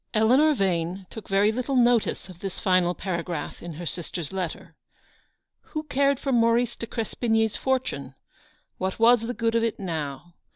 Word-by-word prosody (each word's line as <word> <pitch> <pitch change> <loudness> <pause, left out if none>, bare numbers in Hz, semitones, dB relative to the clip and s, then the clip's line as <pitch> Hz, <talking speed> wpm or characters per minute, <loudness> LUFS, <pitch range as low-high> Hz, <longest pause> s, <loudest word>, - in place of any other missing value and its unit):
Eleanor 260 +8 +5
Yane 185 -2 -1
took 220 - -9
very 200 +2 +3
little 255 +4 -2
notice 240 -5 +3
of 180 -2 -12
this 195 -1 -5
final 185 -2 +2
paragraph 170 -4 -4
in 170 -1 -7
her 170 +3 -7
sister's 170 0 -4
letter. 185 -4 -4 0.9
Who 310 -1 -5
cared 280 -2 +1
for 275 - -2
Maurice 235 0 +3
de 230 - -6
Crespigny's 225 -1 0
fortune? 195 - -2 0.6
What 190 0 -2
was 230 +1 +6
the 240 +2 -4
good 230 -1 0
of 230 0 +2
it 230 -1 -1
now 160 -3 -4
215 Hz, 160 wpm, -26 LUFS, 175-240 Hz, 0.9 s, was